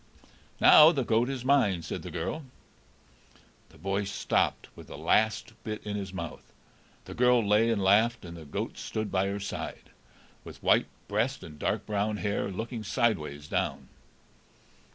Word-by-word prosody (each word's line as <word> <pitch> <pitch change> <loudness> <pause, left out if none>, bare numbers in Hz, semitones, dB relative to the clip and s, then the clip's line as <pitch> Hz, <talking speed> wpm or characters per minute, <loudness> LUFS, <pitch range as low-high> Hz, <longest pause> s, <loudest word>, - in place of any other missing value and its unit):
"Now 155 +1 +9
the 140 -6 -1
goat 115 +2 +1
is 130 -2 -4
mine," 115 -11 +3
said 80 - -5
the - - -7
girl. 155 - -4 1.3
The - - -19
boy 95 +5 -2
stopped 100 - 0
with - - -12
the - - -9
last 110 +1 +1
bit 110 -1 -4
in 105 -1 -3
his 100 -2 -4
mouth, 95 - -7 0.5
the - - -8
girl 125 -3 +3
lay 105 +3 +4
and 110 -4 0
laughed, 110 +3 +3
and 85 0 -8
the 80 -2 -10
goat 70 - -5
stood 110 -1 -4
by 95 0 +1
her 100 +1 -3
side, 100 - -6 0.5
with - - -12
white - - +4 0.2
breast 115 +6 -1
and 75 -2 -11
dark - - -1
brown 105 0 -1
hair, 100 -1 -2
looking 110 +4 -5
sideways 75 -10 -1
down. - - -2
105 Hz, 160 wpm, -28 LUFS, 95-115 Hz, 1.3 s, Now